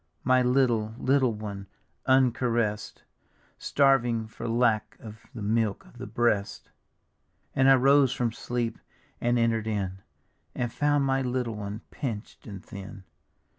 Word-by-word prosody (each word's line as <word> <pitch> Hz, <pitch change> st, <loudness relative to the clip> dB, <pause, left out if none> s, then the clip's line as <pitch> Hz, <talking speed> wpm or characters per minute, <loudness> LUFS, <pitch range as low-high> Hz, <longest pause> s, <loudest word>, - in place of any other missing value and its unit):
My 130 Hz, 0 st, +4 dB
little, 120 Hz, -4 st, +2 dB
little 130 Hz, -3 st, +2 dB
one, 100 Hz, -2 st, -7 dB, 0.4 s
uncaress'd, 120 Hz, -5 st, +1 dB, 0.6 s
Starving 120 Hz, -5 st, +2 dB
for 110 Hz, -, -7 dB
lack 115 Hz, -2 st, +1 dB
of 110 Hz, -1 st, -12 dB
the 110 Hz, -, -5 dB
milk 110 Hz, -1 st, 0 dB
of 120 Hz, -, -17 dB
the 125 Hz, -, -6 dB
breast; 110 Hz, -2 st, -1 dB, 0.8 s
And 135 Hz, 0 st, +4 dB
I 135 Hz, -, +8 dB
rose 135 Hz, 0 st, +4 dB
from 120 Hz, -2 st, -1 dB
sleep 120 Hz, 0 st, -3 dB, 0.4 s
and 120 Hz, +1 st, +2 dB
enter'd 115 Hz, -2 st, +1 dB
in. 95 Hz, -3 st, -2 dB, 0.6 s
And 120 Hz, -2 st, -2 dB
found 145 Hz, -1 st, +2 dB
my 135 Hz, 0 st, +1 dB
little 125 Hz, -2 st, -2 dB
one, 105 Hz, +1 st, -6 dB
pinch'd 115 Hz, -5 st, -6 dB
and 100 Hz, -3 st, -9 dB
thin. 100 Hz, -1 st, -9 dB
115 Hz, 135 wpm, -27 LUFS, 110-130 Hz, 0.8 s, I